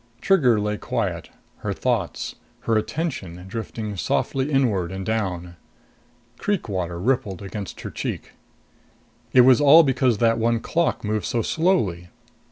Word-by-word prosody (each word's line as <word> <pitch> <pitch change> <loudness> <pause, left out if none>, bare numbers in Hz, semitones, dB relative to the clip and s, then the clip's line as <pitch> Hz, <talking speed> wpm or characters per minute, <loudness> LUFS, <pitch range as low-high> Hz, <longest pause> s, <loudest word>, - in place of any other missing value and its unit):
Trigger 125 - +3
lay 105 0 -1
quiet, - - -3 0.3
her - - -3
thoughts, - - -2 0.3
her 115 - 0
attention 105 - -3
drifting 110 0 -5
softly 135 - -1
inward 105 -11 +1
and 95 0 -5
down. 90 -6 -3 0.8
Creek 205 -3 -1
water 90 -4 -3
rippled 105 -4 -1
against 100 -1 -7
her - - -6
cheek. - - -5 1.0
It 130 - +7
was 130 +2 +6
all 150 +3 +8
because 130 -4 +2
that 115 +1 +2
one 115 +1 +2
clock 165 +2 -1
moved 105 0 -1
so 115 -2 0
slowly. 110 - 0
115 Hz, 135 wpm, -23 LUFS, 95-130 Hz, 1.0 s, all